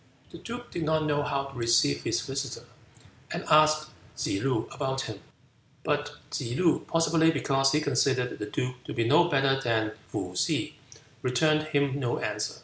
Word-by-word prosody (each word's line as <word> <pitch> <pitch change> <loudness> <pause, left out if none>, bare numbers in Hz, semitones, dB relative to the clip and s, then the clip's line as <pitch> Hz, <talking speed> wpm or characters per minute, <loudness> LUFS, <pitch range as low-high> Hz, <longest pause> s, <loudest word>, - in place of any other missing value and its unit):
The 170 - -10
duke 240 +5 -8
did 170 - -4
not 155 0 +1
know 145 -1 +1
how 140 -1 -1
to 135 0 -10
receive 115 -12 +2
his - - 0
visitor, - - -4 0.6
and - - -4
asked 155 0 +4 0.3
Tsze 100 - -1
loo 130 -5 0
about 135 -1 -2
him. 110 -5 -6 0.6
But 145 -1 -1 0.2
Tsze 120 -3 -3
loo, 175 -3 +2
possibly 165 0 +3
because 135 -3 +2
he 150 - +2
considered 130 -3 +1
the 105 - -4
duke 125 +3 -4
to - - -6
be 115 -1 +1
no 175 - +6
better 135 -4 +2
than 110 -3 0 0.2
Pih - - -4
Hih, - - -1 0.5
returned 155 +5 +2
him 140 -2 +1
no 120 -3 -1
answer. 105 0 -2
140 Hz, 170 wpm, -28 LUFS, 125-155 Hz, 0.6 s, no